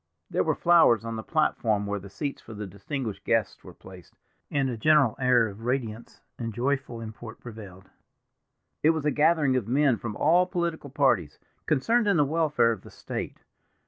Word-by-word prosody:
There -, -, +1 dB
were -, -, 0 dB
flowers 165 Hz, -10 st, +4 dB
on 115 Hz, 0 st, -4 dB
the 110 Hz, -, -4 dB
platform 110 Hz, -8 st, 0 dB
where 100 Hz, 0 st, -2 dB
the 100 Hz, +1 st, -11 dB
seats 140 Hz, +9 st, -5 dB
for 110 Hz, -, -11 dB
the 105 Hz, 0 st, -5 dB
distinguished 105 Hz, +4 st, -5 dB
guests -, -, 0 dB
were -, -, -11 dB
placed, 95 Hz, -2 st, -14 dB, 0.3 s
and 140 Hz, -2 st, 0 dB
a 125 Hz, -, -3 dB
general 140 Hz, 0 st, +3 dB
air 125 Hz, -3 st, +4 dB
of 100 Hz, +1 st, -10 dB
radiance 115 Hz, -2 st, -4 dB, 0.2 s
and 115 Hz, -3 st, -4 dB
joyful 135 Hz, -1 st, -1 dB
import 110 Hz, 0 st, -9 dB
prevailed. 100 Hz, -5 st, -11 dB, 0.9 s
It 155 Hz, -, +4 dB
was 150 Hz, -, -4 dB
a 150 Hz, -, +3 dB
gathering 150 Hz, -3 st, +3 dB
of 120 Hz, -5 st, -1 dB
men 135 Hz, 0 st, +3 dB
from 105 Hz, -2 st, -6 dB
all 175 Hz, +4 st, +3 dB
political 170 Hz, -5 st, -3 dB
parties, 125 Hz, -, +1 dB, 0.3 s
concerned 220 Hz, -, +2 dB
in 200 Hz, -3 st, +3 dB
the 145 Hz, -, +4 dB
welfare 150 Hz, -5 st, +2 dB
of 115 Hz, -, -5 dB
the -, -, -13 dB
State. -, -, -7 dB
125 Hz, 180 wpm, -26 LUFS, 110-150 Hz, 0.9 s, flowers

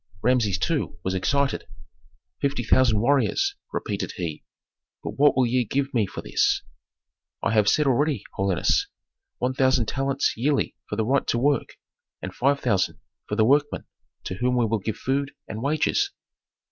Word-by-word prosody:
Rameses, 115 Hz, -6 st, +2 dB
too, 145 Hz, -, -1 dB
was 95 Hz, -, -1 dB
excited. 140 Hz, +9 st, 0 dB, 0.7 s
"Fifty 140 Hz, -3 st, 0 dB
thousand 120 Hz, -2 st, +3 dB
warriors," 145 Hz, -, +2 dB, 0.2 s
repeated 100 Hz, -2 st, -3 dB
he. 85 Hz, -4 st, -5 dB, 0.6 s
"But -, -, -3 dB
what 145 Hz, -1 st, +3 dB
will 130 Hz, -, +4 dB
ye 125 Hz, +1 st, +2 dB
give 135 Hz, +5 st, -2 dB
me 110 Hz, -5 st, +2 dB
for -, -, -7 dB
this?" -, -, +1 dB, 0.8 s
"I -, -, +1 dB
have 105 Hz, -2 st, +4 dB
said 150 Hz, -, +3 dB
already, 135 Hz, -3 st, +1 dB
holiness. 95 Hz, -2 st, +1 dB, 0.5 s
One 125 Hz, +1 st, -1 dB
thousand 130 Hz, -3 st, +3 dB
talents 135 Hz, +3 st, 0 dB
yearly 140 Hz, +5 st, 0 dB
for -, -, -2 dB
the 110 Hz, 0 st, 0 dB
right 135 Hz, +4 st, +1 dB
to -, -, +1 dB
work, 140 Hz, +1 st, 0 dB, 0.4 s
and 90 Hz, -, -6 dB
five 140 Hz, +5 st, +1 dB
thousand 100 Hz, -7 st, +1 dB, 0.3 s
for 105 Hz, -, -1 dB
the 110 Hz, 0 st, +4 dB
workmen, 145 Hz, +4 st, +2 dB, 0.4 s
to -, -, -4 dB
whom 125 Hz, 0 st, +1 dB
we 120 Hz, -, +3 dB
will 110 Hz, 0 st, 0 dB
give 110 Hz, +2 st, -4 dB
food 140 Hz, +2 st, -1 dB
and 110 Hz, -, -6 dB
wages." 155 Hz, -, +1 dB
125 Hz, 160 wpm, -25 LUFS, 110-140 Hz, 0.8 s, will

